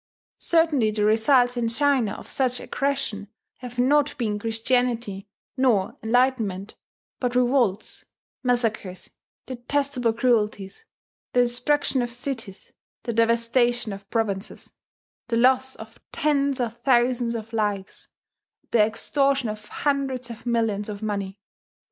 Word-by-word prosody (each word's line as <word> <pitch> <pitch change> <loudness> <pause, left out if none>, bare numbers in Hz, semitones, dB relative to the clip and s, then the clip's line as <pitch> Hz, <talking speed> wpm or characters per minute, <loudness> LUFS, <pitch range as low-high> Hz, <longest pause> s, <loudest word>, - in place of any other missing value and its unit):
Certainly 320 -9 +3
the 210 -1 0
results 245 +3 +3
in 235 -1 0
China 260 -3 +2
of - - -10
such 255 -2 -1
aggression 270 -7 -2 0.3
have 245 -1 -9
not 280 +3 +3
been 215 -4 -1
Christianity 225 -2 -1 0.3
nor 245 -8 +2
enlightenment, 225 -4 0 0.4
but 250 -1 -1
revolts, 245 -5 +1 0.4
massacres, 230 -7 -1 0.3
detestable 255 -1 -1
cruelties, 220 - 0 0.5
the 245 - +5
destruction 250 +3 0
of 240 - -2
cities, 235 -5 -6 0.3
the 235 - -3
devastation 230 0 +2
of 195 0 -11
provinces, 210 -4 -3 0.5
the 230 -1 0
loss 260 +2 +3
of 220 +1 -12
tens 280 -2 +1
of 235 -2 -2
thousands 240 -2 +2
of 225 0 -7
lives, 205 -3 -2 0.6
the 235 - +3
extortion 270 +4 +1
of 210 0 -7
hundreds 270 -4 -2
of 230 +1 -10
millions 225 -3 0
of 205 0 -6
money. 200 -2 -3
240 Hz, 120 wpm, -24 LUFS, 215-260 Hz, 0.6 s, the